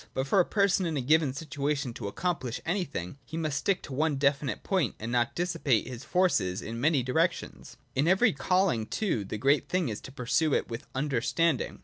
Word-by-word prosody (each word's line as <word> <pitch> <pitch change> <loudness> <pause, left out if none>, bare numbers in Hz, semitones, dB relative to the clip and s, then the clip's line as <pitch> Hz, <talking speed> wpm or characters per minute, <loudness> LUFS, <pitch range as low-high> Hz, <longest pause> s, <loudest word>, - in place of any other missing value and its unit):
But 130 - 0
for 165 +8 +3
a 180 - +5
person 200 -3 +2
in 160 -3 -2
a - - 0
given 150 +2 +3
situation 140 -2 -2
to 100 -4 -5
accomphsh 145 - -2
anything, 160 - -3
he 160 - -7
must 155 -3 -1
stick 195 +2 0
to 135 - -8
one 150 +2 +1
definite 140 -1 0
point, 185 - 0
and 115 +2 -4
not 120 -1 +1
dissipate 165 -9 +1
his 125 0 -7
forces 120 - +1
in 115 +1 -5
many 145 -2 +3
directions. 160 +8 -1 0.2
In 140 +4 +1
every 195 +5 +4
calling, 180 - +1
too, 180 - -1
the 100 +2 -5
great 140 +5 +2
thing 180 -7 +1
is 105 - -5
to - - -10
pursue 130 +4 +1
it - - -1
with 115 0 -6
understanding. 140 +3 0
145 Hz, 200 wpm, -29 LUFS, 125-170 Hz, 0.2 s, a